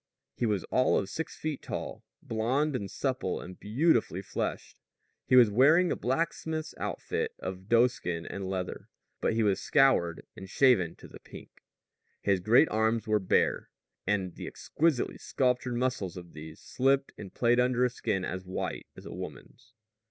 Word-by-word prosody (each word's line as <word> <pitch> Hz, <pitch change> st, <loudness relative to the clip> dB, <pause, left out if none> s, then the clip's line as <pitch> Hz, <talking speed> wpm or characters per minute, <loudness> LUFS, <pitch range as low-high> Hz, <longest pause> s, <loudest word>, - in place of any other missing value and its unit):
He 120 Hz, -, -1 dB
was 105 Hz, -4 st, 0 dB
all 130 Hz, -, +3 dB
of 95 Hz, -, -2 dB
six 160 Hz, -, -5 dB
feet 155 Hz, -2 st, -4 dB
tall, -, -, -6 dB, 0.2 s
blond 130 Hz, +7 st, 0 dB
and 100 Hz, -5 st, -3 dB
supple 130 Hz, -9 st, -2 dB
and 90 Hz, +1 st, -10 dB
beautifully 115 Hz, -, +1 dB
fleshed. -, -, -4 dB, 0.5 s
He -, -, +4 dB
was 120 Hz, -4 st, +7 dB
wearing 155 Hz, -, +5 dB
his -, -, -2 dB
blacksmith's 160 Hz, +3 st, -2 dB
outfit -, -, -3 dB
of 95 Hz, +2 st, -7 dB
doeskin 115 Hz, -8 st, +2 dB
and 95 Hz, -1 st, -5 dB
leather, 95 Hz, -1 st, -4 dB, 0.3 s
but -, -, 0 dB
he 115 Hz, -, +2 dB
was 100 Hz, -2 st, +1 dB
scoured 130 Hz, -, +3 dB
and 95 Hz, -, -10 dB
shaven 115 Hz, -9 st, +3 dB
to -, -, -13 dB
the -, -, -13 dB
pink. -, -, -12 dB, 0.7 s
His 100 Hz, -2 st, +1 dB
great 115 Hz, -, +5 dB
arms 110 Hz, +1 st, +1 dB
were 110 Hz, -1 st, +2 dB
bare; 95 Hz, -, +1 dB, 0.4 s
and 95 Hz, -3 st, 0 dB
the -, -, -8 dB
exquisitely 155 Hz, -5 st, -1 dB
sculptured 125 Hz, -1 st, 0 dB
muscles 120 Hz, -8 st, -1 dB
of 85 Hz, -1 st, -10 dB
these 80 Hz, 0 st, -10 dB
slipped 135 Hz, +1 st, +1 dB
and 95 Hz, -3 st, -9 dB
played 120 Hz, 0 st, +2 dB
under 125 Hz, 0 st, +3 dB
a -, -, +2 dB
skin 95 Hz, -6 st, -2 dB
as 90 Hz, +1 st, -4 dB
white 95 Hz, 0 st, -4 dB
as -, -, -11 dB
a -, -, -7 dB
woman's. 125 Hz, -1 st, -10 dB
115 Hz, 165 wpm, -29 LUFS, 95-130 Hz, 0.7 s, was